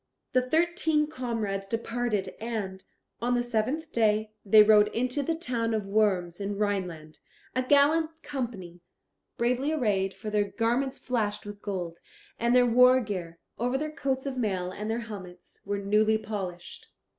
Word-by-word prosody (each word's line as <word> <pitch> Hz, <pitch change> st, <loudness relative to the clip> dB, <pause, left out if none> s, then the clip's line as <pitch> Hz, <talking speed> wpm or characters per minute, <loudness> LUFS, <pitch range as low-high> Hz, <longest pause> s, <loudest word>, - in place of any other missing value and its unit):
The 255 Hz, -, +4 dB
thirteen 320 Hz, +2 st, +2 dB
comrades 230 Hz, -9 st, -3 dB
departed 230 Hz, -2 st, -2 dB
and, 205 Hz, -5 st, -4 dB, 0.4 s
on 245 Hz, +1 st, +1 dB
the 240 Hz, -, +1 dB
seventh 245 Hz, +7 st, -1 dB
day, 215 Hz, -1 st, +1 dB
they 215 Hz, +1 st, +8 dB
rode 210 Hz, -1 st, +6 dB
into 255 Hz, +4 st, 0 dB
the 325 Hz, +4 st, -1 dB
town 235 Hz, -8 st, -1 dB
of 210 Hz, -2 st, -2 dB
Worms 195 Hz, -3 st, +1 dB
in 200 Hz, 0 st, -3 dB
Rhineland, 180 Hz, -7 st, -2 dB, 0.4 s
a 255 Hz, -, +2 dB
gallant 290 Hz, +4 st, +4 dB
company, 195 Hz, -11 st, -5 dB, 0.6 s
bravely 250 Hz, +5 st, +1 dB
arrayed, 200 Hz, -10 st, 0 dB
for 215 Hz, -1 st, -6 dB
their 210 Hz, -1 st, +2 dB
garments 240 Hz, +6 st, 0 dB
flashed 210 Hz, -5 st, -2 dB
with 205 Hz, 0 st, -8 dB
gold, 175 Hz, -4 st, -4 dB, 0.4 s
and 235 Hz, +1 st, +2 dB
their 250 Hz, 0 st, +6 dB
war 250 Hz, +2 st, +6 dB
gear, 185 Hz, -8 st, -5 dB, 0.2 s
over 245 Hz, +3 st, +1 dB
their 305 Hz, +2 st, -3 dB
coats 270 Hz, -4 st, -2 dB
of 270 Hz, -2 st, -3 dB
mail 190 Hz, -6 st, -1 dB
and 210 Hz, +3 st, -5 dB
their 230 Hz, +2 st, -1 dB
helmets, 185 Hz, -6 st, -10 dB
were 205 Hz, 0 st, -1 dB
newly 210 Hz, +2 st, +3 dB
polished. 190 Hz, -5 st, -6 dB
220 Hz, 155 wpm, -28 LUFS, 200-255 Hz, 0.6 s, they